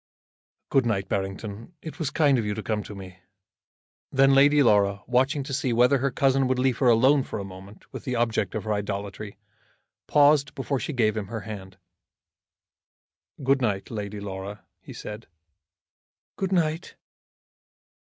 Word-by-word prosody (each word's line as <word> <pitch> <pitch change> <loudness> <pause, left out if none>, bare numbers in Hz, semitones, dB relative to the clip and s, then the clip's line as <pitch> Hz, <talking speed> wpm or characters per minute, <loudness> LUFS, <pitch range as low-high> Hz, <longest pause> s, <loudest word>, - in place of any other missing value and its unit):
"Good 135 -3 +2
night, 95 -4 -1
Barrington. 100 - -4
It 160 +2 -8
was 155 -5 -1
kind 145 -4 +3
of - - -1
you 105 0 -2
to 110 - -5
come 110 -2 -1
to 105 - -9
me." 95 -1 -11 0.9
Then 135 0 +4
Lady 145 +2 +6
Laura, 100 -4 +3
watching 135 +4 +1
to 135 - -6
see 130 -2 0
whether 125 +4 +4
her 140 +2 +1
cousin 135 0 +2
would 130 0 0
leave 125 -1 +1
her 130 - +3
alone 130 +5 +5
for - - -5
a 100 - -4
moment 95 +2 -12
with - - -7
the 125 - -2
object 115 -4 0
of 110 - -3
her 110 -1 -1
idolatry, 100 0 -5 0.7
paused 145 -1 +4
before 135 -1 -2
she - - -4
gave 110 -6 +1
him 105 -3 -3
her 110 +1 -5
hand. 95 -3 -9 1.7
"Good 135 +1 +2
night, 100 -5 -1
Lady 105 -2 -5
Laura," 100 0 -7 0.2
he - - -12
said. 105 +2 -8 1.1
"Good 190 -1 -2
night!" 165 -2 0
115 Hz, 160 wpm, -25 LUFS, 100-135 Hz, 1.7 s, Lady